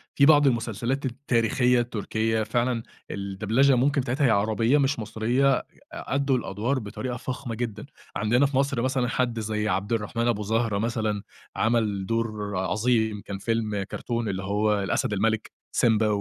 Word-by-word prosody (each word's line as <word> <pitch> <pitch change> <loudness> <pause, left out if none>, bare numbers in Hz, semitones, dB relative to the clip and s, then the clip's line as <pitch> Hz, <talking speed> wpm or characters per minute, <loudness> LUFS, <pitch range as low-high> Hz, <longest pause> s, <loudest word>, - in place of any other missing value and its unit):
في 140 - +5
بعض 145 -1 +6
المسلسلات 120 +2 -1
التاريخية 125 -1 +2
التركية 110 -1 -1
فعلًا 120 +1 0 0.3
الدبلچة 110 +7 +1
ممكن 140 +3 +2
بتاعتها 130 +4 0
هي - - +3
عربية 110 +5 +2
مش 140 -3 +1
مصرية 120 +5 +1
ي - - -10 0.3
أدّوا 140 -1 0
الأدوار 120 +6 -1
بطريقة 120 +3 -5
فخمة 125 -1 -5
جدًا، 115 -3 -4 0.3
عندنا 120 +7 +3
في 135 -1 -1
مصر 135 -3 +1
مثلًا 130 -1 0
حد 120 -2 0
زي 105 -1 -2
عبد 100 +4 -1
الرحمن 115 +2 -1
أبو 105 -3 0
زهرة 110 0 0
مثلًا 110 -2 -1 0.3
عمل 110 -4 +1
دور 110 -3 -2
عظيم 110 +1 +1
كان 100 -1 -5
فيلم 110 -1 -1
كرتون 115 +3 -3
اللي 95 0 -3
هو 105 +1 +1
الأسد 100 +2 0
الملك 110 +2 0 0.2
سيمبا 110 -1 +3
115 Hz, 150 wpm, -26 LUFS, 105-125 Hz, 0.3 s, بعض